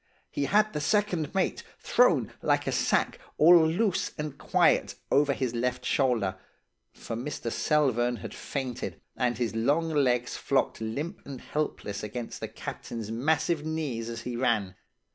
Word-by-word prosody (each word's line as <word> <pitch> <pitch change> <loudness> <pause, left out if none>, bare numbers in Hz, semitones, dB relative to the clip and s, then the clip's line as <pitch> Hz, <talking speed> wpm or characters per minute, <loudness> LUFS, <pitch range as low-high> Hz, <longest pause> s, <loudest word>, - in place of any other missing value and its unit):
He 140 - -1
had 210 +5 +3
the 150 - -2
second 185 -3 0
mate, - - 0 0.2
thrown - - +3
like - - +2
a - - 0
sack, - - +1 0.2
all 165 0 +7
loose 190 +3 0
and 150 -2 -4
quiet, - - +2 0.2
over 145 0 +4
his 130 -3 -1
left 125 +1 -1
shoulder; 115 -9 +1 0.5
for 115 - -7
Mr. 120 -1 -4
Selvern 125 -5 +2
had 105 - -8
fainted, 130 -3 -4 0.2
and 125 -2 0
his 120 -3 -1
long 145 +9 +2
legs 125 -5 +1
flogged - - 0
limp 145 - -4
and 135 -3 -8
helpless 125 -9 -3
against 115 +3 -5
the - - -4
captain's 110 -2 -6
massive 150 +6 +1
knees 150 -8 -3
as 115 0 -5
he 120 0 -5
ran. 105 -6 +1
130 Hz, 150 wpm, -28 LUFS, 120-155 Hz, 0.5 s, all